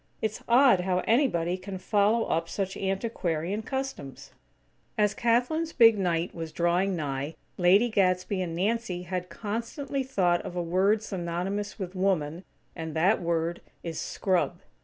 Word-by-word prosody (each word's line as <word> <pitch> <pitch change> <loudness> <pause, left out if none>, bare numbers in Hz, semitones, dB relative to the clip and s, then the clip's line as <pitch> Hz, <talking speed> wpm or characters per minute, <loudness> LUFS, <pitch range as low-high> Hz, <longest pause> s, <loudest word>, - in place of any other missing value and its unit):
It's 220 -1 -2
odd 245 -4 +6
how 180 0 0
anybody 185 - +2
can 190 +1 -6
follow 210 +4 +2
up 165 +1 -1
such 195 -1 -3
antiquarian 195 -2 -2
customs." 265 - -5 0.7
As 210 -1 +3
Kathlyn's 250 +9 +1
big 230 -2 +7
night 175 -2 0
was 165 -2 -6
drawing 175 +3 +1
nigh, 145 -1 -3 0.2
Lady 190 +6 +5
Gadsby 185 -2 +1
and 170 -2 -3
Nancy 195 -1 -1
had 180 0 -4
constantly 230 - -4
thought 185 -10 +1
of 175 - -7
a 175 - -1
word 195 +5 +2
synonymous 190 +2 -3
with 190 -3 -5
"woman", 180 -3 0 0.3
and 160 -2 -6
that 185 +6 +3
word 170 0 -1 0.2
is 165 -2 -4
"scrub." 185 -2 -1
185 Hz, 140 wpm, -28 LUFS, 170-220 Hz, 0.7 s, big